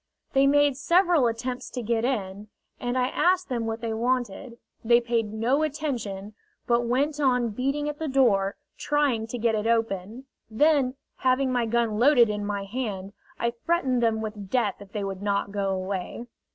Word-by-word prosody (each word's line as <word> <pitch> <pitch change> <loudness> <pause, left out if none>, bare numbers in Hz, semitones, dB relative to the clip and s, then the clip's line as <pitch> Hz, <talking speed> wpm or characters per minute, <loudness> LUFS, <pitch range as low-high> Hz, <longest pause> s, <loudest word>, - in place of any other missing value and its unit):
They 275 0 +4
made 290 -1 +3
several 340 -2 +3
attempts 245 +2 -4
to 250 - -5
get 225 0 0
in, 205 -5 -2 0.3
and 245 +1 -2
I 255 0 +1
asked 365 +3 +1
them 235 -3 -2
what 225 0 -3
they 230 -1 -2
wanted. 240 0 -2 0.3
They 235 +1 +5
paid 230 -3 -1
no 235 +7 +1
attention, 245 -10 -3 0.3
but 235 0 +1
went 285 +5 0
on 250 -4 +2
beating 275 +7 -2
at 295 0 -4
the 320 - -2
door, 215 -8 +2 0.2
trying 280 -7 +1
to 245 - -5
get 230 -1 +1
it 215 0 -1
open. 225 +1 -1 0.2
Then, 270 +2 +2 0.2
having 260 0 +2
my 245 -2 +1
gun 225 -2 0
loaded 245 -3 +6
in 210 0 -3
my 205 -1 -2
hand, 200 -3 -4 0.3
I 235 - +1
threatened 255 0 0
them 225 -2 +1
with 210 -3 -6
death 230 -4 +1
if 200 -1 -13
they 210 -2 -3
would 195 -1 -5
not 200 0 -1
go 200 -1 -1
away. 190 +4 -3
235 Hz, 180 wpm, -26 LUFS, 210-265 Hz, 0.3 s, loaded